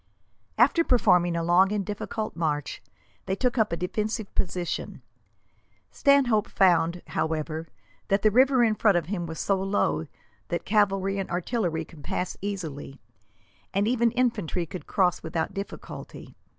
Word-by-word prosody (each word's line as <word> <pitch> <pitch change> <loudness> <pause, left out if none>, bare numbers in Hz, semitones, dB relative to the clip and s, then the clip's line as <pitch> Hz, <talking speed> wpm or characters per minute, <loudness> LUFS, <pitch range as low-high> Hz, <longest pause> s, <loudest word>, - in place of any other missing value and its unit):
After 270 +8 +4
performing 180 - +3
a 170 - -1
long 180 +3 +4
and 205 -2 -1
difficult 210 +2 -4
march, 150 -4 -2 0.5
they 190 - 0
took 250 +3 0
up 220 - +2
a 170 - -1
defensive 210 +4 -3
position. 175 -2 -3 0.9
Stanhope 260 -7 +3
found, 175 -2 +2
however, 160 0 -2 0.4
that 195 0 +1
the 215 - +5
river 260 +2 +5
in 225 -2 +3
front 210 -3 +3
of 170 - -1
him 175 -1 -3
was 160 -1 -7
so 195 -1 +1
low 80 - 0 0.4
that 170 - -3
cavalry 195 -1 +1
and 195 - -4
artillery 175 -3 -1
could 150 -2 -15
pass 180 - -3
easily, 160 -9 -5 0.8
and 200 +2 +2
even 235 0 +3
infantry 220 -9 0
could 180 +3 -9
cross 180 -3 +1
without 160 +3 -3
difficulty. 195 +1 -8
195 Hz, 145 wpm, -26 LUFS, 170-215 Hz, 0.9 s, the